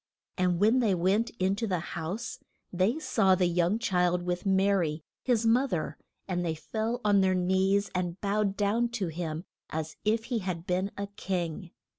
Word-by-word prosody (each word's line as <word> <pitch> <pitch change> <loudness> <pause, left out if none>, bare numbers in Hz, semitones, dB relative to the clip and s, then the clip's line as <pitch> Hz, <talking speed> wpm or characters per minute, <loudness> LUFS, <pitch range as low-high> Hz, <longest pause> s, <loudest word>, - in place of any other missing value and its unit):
And 180 -2 +1
when 220 +6 +4
they 215 -6 +3
went 195 +7 +2
in 190 +1 +1
to 225 +1 -1
the 185 -3 0 0.2
house 175 +8 -4 0.3
they 190 - +2
saw 200 -11 +3
the 185 -1 +2
young 175 +3 +2
child, 180 -6 +1
with 180 +2 -2
Ma 195 +1 +3
ry, 165 -5 0 0.2
his 235 -3 +1
mo 245 +4 +4
ther, 170 -10 -2 0.3
and 175 -2 -1
they 165 -2 -1
fell 220 +8 -3
on 205 -1 +5
their 190 -1 +3
knees 190 +2 +2
and 180 0 -2
bowed 200 -1 0
down 220 +4 +1
to 190 -5 -1
him 160 0 -4 0.3
as 160 0 -4
if 220 +1 +1
he 230 - +2
had 180 -4 -4
been 185 +1 0
a 200 - -2
king. 180 -4 -4
190 Hz, 185 wpm, -29 LUFS, 175-210 Hz, 0.3 s, on